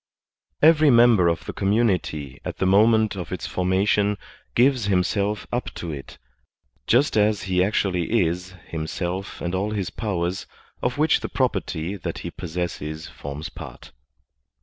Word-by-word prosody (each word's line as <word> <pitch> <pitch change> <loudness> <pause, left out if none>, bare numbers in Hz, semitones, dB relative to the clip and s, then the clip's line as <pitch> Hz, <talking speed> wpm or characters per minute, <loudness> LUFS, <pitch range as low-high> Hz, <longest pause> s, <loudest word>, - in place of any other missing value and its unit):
Every 155 -1 +7
member 115 -7 +6
of 85 -1 0
the - - -5
community 95 - 0
at - - -5
the - - 0
moment 110 +3 +4
of 90 -3 -6
its - - -4
formation 100 +3 +1 0.4
gives 125 -2 +3
himself 100 +2 0
up 120 +1 -2
to 85 - -5
it, 70 -3 -8 0.7
just 130 +4 +3
as 105 -1 +2
he 90 -2 +2
actually 95 0 +1
is, 90 +3 -4
himself 85 +4 -4
and 85 +1 -2
all 95 +3 0
his 100 -4 -3
powers, 90 -4 -2 0.3
of 125 +2 -1
which 155 +1 +3
the - - -5
property 85 +6 -1
that 90 - -5
he - - -4
possesses 80 -2 -5
forms 70 +2 -7
part. - - -11
95 Hz, 145 wpm, -24 LUFS, 85-110 Hz, 0.7 s, Every